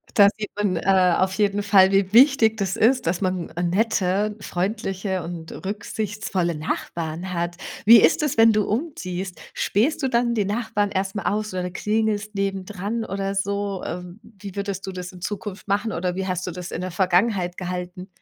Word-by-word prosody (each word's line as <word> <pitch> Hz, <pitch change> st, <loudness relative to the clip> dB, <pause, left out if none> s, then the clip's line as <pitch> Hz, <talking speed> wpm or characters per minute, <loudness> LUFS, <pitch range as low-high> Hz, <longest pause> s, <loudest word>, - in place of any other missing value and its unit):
Da 200 Hz, -2 st, +8 dB
sieht 210 Hz, -1 st, -4 dB
man, 205 Hz, -3 st, 0 dB
äh, 185 Hz, 0 st, +3 dB
auf 190 Hz, 0 st, +1 dB
jeden 205 Hz, -1 st, +1 dB
Fall 195 Hz, -2 st, +5 dB
wie 195 Hz, -1 st, +2 dB
wichtig 240 Hz, -3 st, +6 dB
das 195 Hz, -3 st, -1 dB
ist, 250 Hz, +4 st, +3 dB
dass 175 Hz, +3 st, 0 dB
man 185 Hz, -2 st, -1 dB
n 175 Hz, +1 st, -1 dB
nette, 205 Hz, 0 st, +1 dB
freundliche 190 Hz, 0 st, -2 dB
und 165 Hz, -1 st, -7 dB
rücksichtsvolle 205 Hz, -3 st, -3 dB
Nachbarn 165 Hz, +3 st, -4 dB
hat. 175 Hz, 0 st, -2 dB, 0.3 s
Wie 225 Hz, 0 st, +9 dB
ist -, -, +4 dB
es, 300 Hz, -, 0 dB
wenn 225 Hz, 0 st, +7 dB
du 210 Hz, -1 st, +2 dB
umziehst? 190 Hz, -, -4 dB
Spähst 250 Hz, +11 st, +1 dB
du 270 Hz, -, +1 dB
dann 235 Hz, -1 st, +2 dB
den 210 Hz, -4 st, 0 dB
Nachbarn 210 Hz, -1 st, -1 dB
erst 190 Hz, 0 st, -1 dB
mal 200 Hz, -, -4 dB
aus 210 Hz, 0 st, -2 dB
oder 180 Hz, -1 st, -2 dB
klingelst 210 Hz, +2 st, -1 dB
neben 195 Hz, -1 st, -2 dB
dran 210 Hz, +4 st, -3 dB
oder 195 Hz, 0 st, -3 dB
so? 200 Hz, 0 st, -2 dB
Ähm, 180 Hz, +2 st, -6 dB
wie 205 Hz, -3 st, -11 dB
würdest 200 Hz, -1 st, -3 dB
du -, -, -3 dB
das 180 Hz, -1 st, -6 dB
in 180 Hz, -1 st, -13 dB
Zukunft 205 Hz, +1 st, -5 dB
machen, 205 Hz, +3 st, 0 dB
oder 180 Hz, -2 st, -2 dB
wie 190 Hz, 0 st, -2 dB
hast 185 Hz, -1 st, -2 dB
du -, -, -2 dB
das 180 Hz, +1 st, -7 dB
in -, -, -4 dB
der 185 Hz, 0 st, -4 dB
Vergangenheit 180 Hz, 0 st, +1 dB
gehalten? 180 Hz, 0 st, -5 dB
195 Hz, 190 wpm, -23 LUFS, 180-210 Hz, 0.3 s, Wie